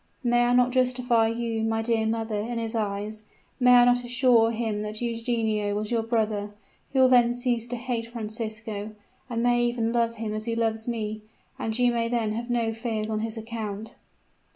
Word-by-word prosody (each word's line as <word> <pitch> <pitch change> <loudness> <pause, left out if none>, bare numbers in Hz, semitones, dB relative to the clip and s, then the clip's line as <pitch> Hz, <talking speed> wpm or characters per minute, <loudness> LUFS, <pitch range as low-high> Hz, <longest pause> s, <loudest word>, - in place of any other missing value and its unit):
May 240 0 +3
I 245 - +2
not 250 0 +4
justify 250 -2 +2
you, 230 -1 -2
my 225 0 0
dear 225 -1 +1
mother, 220 -1 -1
in 235 +3 -3
his 225 -1 -3
eyes? 210 0 -3 0.4
May 250 -1 +6
I 245 0 +7
not 245 0 +3
assure 245 -2 +4
him 225 -2 -2
that 215 0 -4
Eugenio 230 -3 -1
was 210 +1 -3
your 230 -1 +2
brother? 215 -3 -1 0.4
He 270 - -3
will 260 0 +7
then 240 -1 +5
cease 245 -2 -1
to 245 - -4
hate 240 -1 -3
Francisco, 220 -2 -5 0.4
and 235 -1 -1
may 240 0 +3
even 240 -1 0
love 230 -1 +1
him 220 -1 -4
as 215 0 -3
he 230 -1 -1
loves 225 -1 -1
me; 215 -2 -3 0.4
and 220 0 -2
you 245 -1 +3
may 230 -1 0
then 230 -3 0
have 235 +2 -4
no 230 -2 0
fears 220 -1 -3
on 215 - -1
his 225 +1 -4
account." 220 -1 -5
230 Hz, 195 wpm, -26 LUFS, 220-240 Hz, 0.4 s, I